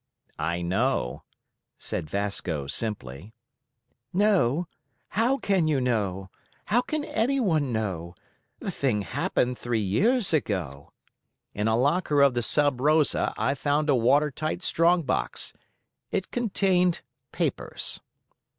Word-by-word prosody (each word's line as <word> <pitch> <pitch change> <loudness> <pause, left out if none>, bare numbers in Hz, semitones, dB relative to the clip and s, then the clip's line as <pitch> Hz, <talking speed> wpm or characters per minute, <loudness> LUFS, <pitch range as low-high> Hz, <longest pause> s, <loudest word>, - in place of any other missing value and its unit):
"I 85 +1 -1
know," 95 - 0 0.6
said 75 - -4
Vasco 95 -6 -2
simply. 95 - -4 0.8
"Know? 180 - +2 0.4
How 235 +6 +2
can 190 -9 +1
you 150 -3 +2
know? 100 -7 -1 0.3
How 235 +5 +3
can 305 +3 -3
anyone 220 - +1
know? 95 -6 -3 0.4
The - - -4
thing 115 -7 0
happened 125 +4 -1
three 120 -1 -1
years 195 - +2
ago." 85 - -2 0.6
"In 105 +2 -1
a 110 0 +2
locker 145 +2 +3
of 140 -2 +5
the 120 - 0
Sub 145 +1 +1
Rosa 150 +1 +3
I - - +1
found 145 +2 +1
a - - +4
water 140 +5 +3
tight 155 +6 -3
strong 170 +2 +3
box. 130 - -2 0.6
It 190 - -3
contained 190 -6 +1 0.3
papers." - - -1
135 Hz, 120 wpm, -26 LUFS, -, 0.8 s, of